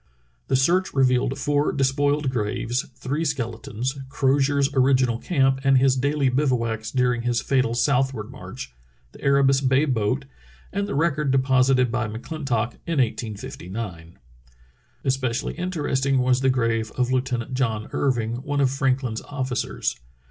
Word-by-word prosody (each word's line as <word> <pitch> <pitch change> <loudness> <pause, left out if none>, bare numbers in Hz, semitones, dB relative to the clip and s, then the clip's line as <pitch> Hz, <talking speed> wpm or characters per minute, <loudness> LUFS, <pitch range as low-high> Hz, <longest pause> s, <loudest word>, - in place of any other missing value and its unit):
The 135 - +1
search 175 +8 +2
revealed 130 0 +2
four 145 +1 +1
despoiled 145 +1 +1
graves, 120 +4 -2
three 135 +5 -2
skeletons, 125 -2 -3
Crozier's 140 +1 +2
original 130 -3 +3
camp 135 -5 +1
and 135 -1 +5
his 130 0 +4
daily 140 +1 +1
bivouacs 120 -5 0
during 125 -1 +1
his 120 0 0
fatal 130 0 +1
southward 130 -3 0
march, 130 - -9 0.4
the - - -16
Erebus 140 -1 +3
Bay 135 +2 +3
boat, 125 0 0 0.5
and 200 +1 -1
the 205 - -3
record 150 -1 +1
deposited 130 -1 +3
by 120 -2 -1
McClintock 120 0 -3
in 165 -2 -1
1859. 100 -7 -4 0.9
Especially 130 -1 -1
interesting 145 -7 -1
was 125 0 +2
the 135 - +3
grave 115 -3 0
of 125 0 +1
Lieutenant 125 -1 -1
John 115 -5 -1
Irving, 120 -4 0
one 145 +1 -2
of 135 -2 +3
Franklin's 130 -4 0
officers. 130 -3 -3
130 Hz, 135 wpm, -24 LUFS, 120-140 Hz, 0.9 s, and